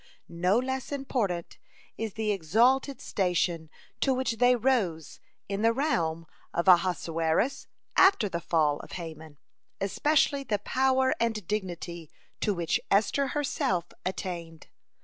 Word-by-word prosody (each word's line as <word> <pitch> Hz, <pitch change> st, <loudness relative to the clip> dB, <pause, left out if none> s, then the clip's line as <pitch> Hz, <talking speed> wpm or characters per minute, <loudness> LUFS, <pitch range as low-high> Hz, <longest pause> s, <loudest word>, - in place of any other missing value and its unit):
No 180 Hz, +5 st, +1 dB
less 260 Hz, +2 st, -2 dB
important 235 Hz, -11 st, -2 dB, 0.4 s
is 220 Hz, -2 st, -5 dB
the 220 Hz, -1 st, 0 dB
exalted 235 Hz, -, +2 dB
station 175 Hz, -4 st, -1 dB, 0.3 s
to 265 Hz, -2 st, +2 dB
which 255 Hz, -3 st, -1 dB
they 245 Hz, +1 st, +5 dB
rose 210 Hz, -, 0 dB, 0.3 s
in 200 Hz, +1 st, -3 dB
the 225 Hz, +1 st, +4 dB
realm 165 Hz, -, 0 dB, 0.3 s
of 170 Hz, +2 st, 0 dB
Ahasuerus 170 Hz, +3 st, +2 dB, 0.3 s
after 380 Hz, -, +5 dB
the 170 Hz, -3 st, -3 dB
fall 150 Hz, -4 st, +1 dB
of -, -, -11 dB
Haman, 160 Hz, -3 st, -8 dB, 0.4 s
especially 280 Hz, +7 st, +1 dB
the 215 Hz, -6 st, 0 dB
power 260 Hz, +4 st, +2 dB
and 225 Hz, -4 st, -1 dB
dignity 175 Hz, -5 st, -4 dB, 0.3 s
to 210 Hz, -, +1 dB
which 175 Hz, -4 st, 0 dB
Esther 220 Hz, +7 st, +2 dB
herself 185 Hz, -, -1 dB
attained. 175 Hz, -3 st, -5 dB
195 Hz, 125 wpm, -28 LUFS, 170-255 Hz, 0.4 s, they